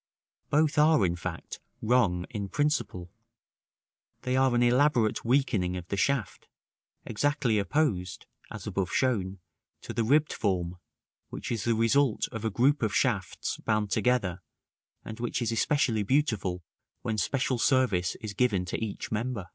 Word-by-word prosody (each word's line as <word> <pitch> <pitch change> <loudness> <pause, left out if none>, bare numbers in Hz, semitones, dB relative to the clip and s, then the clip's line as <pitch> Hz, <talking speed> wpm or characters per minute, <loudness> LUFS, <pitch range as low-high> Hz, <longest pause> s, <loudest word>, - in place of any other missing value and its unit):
Both 150 0 +2
are, 155 -8 +5
in 85 -1 0
fact, 90 -1 -6 0.2
wrong 105 -7 +2
in 100 -4 -4
principle; 140 - -1 1.1
they 125 0 0
are 130 -1 +3
an 120 - +3
elaborate 125 -2 +2
weakening 115 -8 +1
of 90 -1 -8
the - - -1
shaft, 120 0 -1 0.6
exactly 125 -1 0
opposed 100 - -1 0.2
(as - - -8
above 95 -2 -2
shown) 100 -7 0 0.4
to - - -7
the 115 +1 0
ribbed 150 +6 +3
form, 90 -3 -1 0.5
which - - -6
is 115 -4 -2
the 115 -1 +2
result 115 +2 +2
of 110 -1 -6
a 110 - +1
group 130 +8 +2
of 110 -3 0
shafts 105 -9 -1
bound 105 -2 -1
together, 100 -8 +1 0.6
and 110 0 -8
which 120 +1 -2
is 120 -2 -1
especially 120 -2 +1
beautiful 100 - 0 0.4
when 110 -1 -1
special 125 +4 0
service 115 -10 +2
is 110 -2 -5
given 105 -6 +1
to 90 - -3
each 105 -3 -5
member. 110 -4 -3
115 Hz, 145 wpm, -28 LUFS, 95-130 Hz, 1.1 s, are